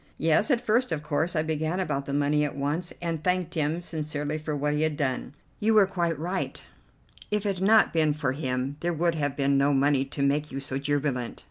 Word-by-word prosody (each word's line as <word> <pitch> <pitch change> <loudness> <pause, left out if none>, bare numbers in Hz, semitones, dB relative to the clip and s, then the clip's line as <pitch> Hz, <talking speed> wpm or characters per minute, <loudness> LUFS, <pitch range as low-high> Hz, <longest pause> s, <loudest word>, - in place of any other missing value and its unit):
"Yes, 160 - +3
at 255 -4 +3
first, 240 +1 +1
of 155 -2 -2
course. 160 +5 -1
I 155 - +2
began 160 +3 -1
about 140 -7 -2
the 140 - -3
money 145 +1 +2
at 145 - -2
once, 150 +5 -2
and 165 -2 -2
thanked 180 -2 0
him 155 +1 0
sincerely 150 -2 -3
for 155 0 -3
what 145 +1 0
he 150 - 0
had 155 -2 0
done." 135 0 -2 0.2
"You 220 +1 +2
were 210 -2 +7
quite 170 -4 -1
right; 180 +5 -3 0.7
if 210 0 -1
it 195 -3 -1
had 190 - +1
not 220 0 +5
been 155 -2 +3
for 145 -3 -1
him 130 0 -2
there 175 0 -1
would 170 +1 +1
have 145 -3 -2
been 140 -1 +2
no 140 +1 +3
money 140 0 +3
to 140 +1 -3
make 145 +2 +1
you 135 - -4
so 135 0 -3
jubilant." 140 -3 -1
150 Hz, 225 wpm, -27 LUFS, 140-170 Hz, 0.7 s, were